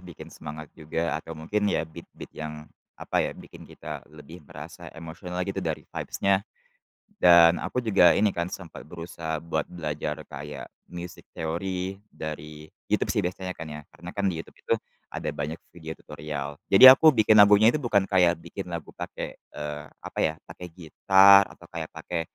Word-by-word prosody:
bikin 85 -4 -11
semangat 75 0 -9
juga 80 +1 -3
atau 80 - -9
mungkin 105 +7 -1
ya, 85 - 0
beat 80 -1 -12
beat - - -10
yang 75 -1 -7 0.3
apa - - -4
ya - - -2
bikin - - -13
kita - - -8
lebih 75 +3 -12
merasa - - -10
emosional 85 +3 -6
gitu 95 0 -3
dari 80 -4 -3
vibes-nya. 100 -1 0 0.8
Dan 85 - +7
aku 125 - -2
juga 95 -7 +5
ini 105 +1 +4
kan 85 +1 -2
sempat 90 -4 -9
berusaha 80 -1 -6
buat 85 +2 -2
belajar 75 -2 -4
kayak 75 +1 -8 0.2
music 90 -1 -8
theory 90 +3 -3 0.2
dari 75 0 -7 0.2
YouTube - - +1
sih - - +1
biasanya 90 +1 -3
kan 80 - -7
ya, 75 - -7
karena 85 +1 -10
kan 100 - -3
di 90 - -2
YouTube - - -20
itu - - +1 0.3
ada - - -5
banyak 75 +3 -4 0.2
video 80 -2 -8
tutorial. 75 -1 -6
Jadi 95 - +7
aku 155 +3 +5
bikin 110 -1 +5
lagunya 105 +2 +7
itu - - 0
bukan 105 -7 +2
kayak 90 -3 +3
bikin 90 +3 -7
lagu 85 -3 -6
pakai, - - -6
eee, 75 0 -7 0.2
apa - - -9
ya, - - +1
pakai 90 - -10
gitar 95 +4 +6
atau - - -16
kayak 80 -1 -5
pakai 85 -2 -4
85 Hz, 170 wpm, -26 LUFS, 80-95 Hz, 0.8 s, Dan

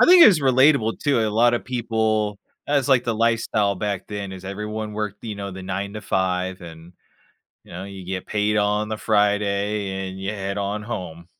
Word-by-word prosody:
I - - +7
think 355 -1 +9
it - - +11
was 175 -8 +5
relatable 130 -3 +4
too, 140 -6 +2
a 110 - +1
lot 120 +3 +4
of - - -3
people 110 -4 0 0.3
that 145 - +2
was, 140 -1 +1
like, 130 -3 +5
the 115 -2 0
lifestyle 110 -3 +1
back 100 -1 -3
then, 100 -2 -5
is 95 0 -9
everyone 105 +2 -5
worked, 105 0 -4
you 110 -2 -4
know, 100 -1 -5
the 95 0 -8
9 100 +2 -4
to 105 - -5
5, 95 0 -1
and, 85 0 -11 0.7
you - - -17
know, 90 +2 -6
you 100 -1 -9
get 95 0 -4
paid 105 0 0
on 105 +1 +1
the 110 - -3
Friday, 100 -2 0
and 95 - -9
you 95 +2 -3
head 100 -1 -4
on 100 +1 -2
home. 90 -7 -6
105 Hz, 210 wpm, -23 LUFS, 95-110 Hz, 0.7 s, it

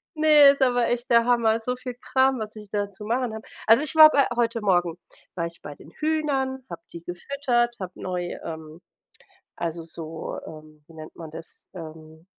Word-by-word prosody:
Ne, 305 -2 +7
ist 280 - -1
aber 245 -2 +3
echt 240 +1 -2
der 235 -1 +5
Hammer, 230 -2 +3
so 250 +2 -2
viel 250 0 -7
Kram, 260 +1 +2
was 215 -1 -6
ich 210 -1 -11
da 205 -1 -2
zu 210 +2 -10
machen 240 0 0
habe. 220 - -9 0.2
Also 225 +5 +6
ich 305 - -5
war 310 0 +10
bei 280 -2 +3
heute 230 -1 +1
Morgen 175 -4 +1 0.4
war 170 -1 -1
ich 170 - -11
bei 145 - -8
den 155 - -16
Hühnern, 275 - -1
habe 170 -1 -8
die 170 - -9
gefüttert, 240 +6 -1
habe 185 -1 -5
neu, 180 -1 -4
ähm 160 0 -8 0.8
also 170 -1 -3
so, 160 -1 -7
ähm 155 -1 -13
wie 165 - -17
nennt 155 0 -10
man 160 -2 -9
das, 165 - -10
ähm, 160 -1 -11
220 Hz, 195 wpm, -25 LUFS, 170-255 Hz, 0.8 s, war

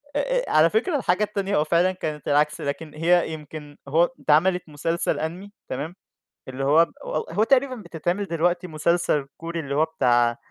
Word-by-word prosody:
آآ - - +2 0.2
آآ، - - -5
على 155 +2 +5
فكرة 250 - 0
الحاجة 200 -5 +1
التانية 200 -1 -2
هو 150 - +3
فعلًا 170 +4 +2
كانت 155 -5 -5
العكس 150 +2 +2
لكن 150 +1 -4
هي 165 +1 +2
يمكن 150 -1 -9
هو 165 +5 +3
اتعملت 175 +3 +2
مسلسل 165 +3 -1
Anime 175 +6 -5 0.2
تمام، 150 +7 -4 0.5
اللي 130 +1 -5
هو 155 +4 +5
ب - - -21
هو - - -5 0.2
هو 205 +6 +2
تقريبًا 265 +2 +2
بتتعمل 175 -1 -3
دلوقتي 175 +1 0
مسلسل 155 -2 0
كوري 165 +1 -5
اللي 140 -3 -4
هو 155 +2 +3
بتاع 120 -6 +2
165 Hz, 175 wpm, -24 LUFS, 150-180 Hz, 0.5 s, على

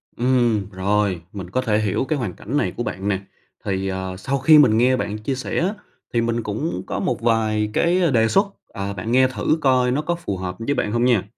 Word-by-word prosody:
Ừm, 120 -5 +1
rồi, 95 -1 0
mình 95 -4 -7
có 130 +7 0
thể 110 -4 +1
hiểu 110 +4 0
cái 150 0 -1
hoàn 110 -8 -3
cảnh 125 +11 -4
này - - 0
của 120 - -1
bạn 95 -3 -4
nè. 100 -2 +1 0.5
Thì, 95 -1 -1
ờ, 95 0 -4
sau 135 +9 -2
khi 155 +4 +7
mình 110 -7 +5
nghe 125 +2 +4
bạn 105 -4 -3
chia 120 +5 -3
sẻ 130 - -4
á 185 +5 0 0.4
thì 120 - +2
mình 115 0 -1
cũng 110 +11 -3
có - - -3
một 185 - -1
vài 110 -2 +1
cái 175 -2 +2
đề 115 -2 +3
xuất, 195 - +3 0.3
à, 100 +1 -4
bạn 110 +5 -4
nghe 130 +1 +5
thử 130 +4 0
coi 130 -2 +3
nó 140 +4 0
có 170 +3 -1
phù 100 - -4
hợp 90 -1 -4
với 125 +5 -1
bạn 105 - -1
hông 120 +2 +1
nha. 120 -7 +3
115 Hz, 235 wpm, -22 LUFS, 100-130 Hz, 0.5 s, khi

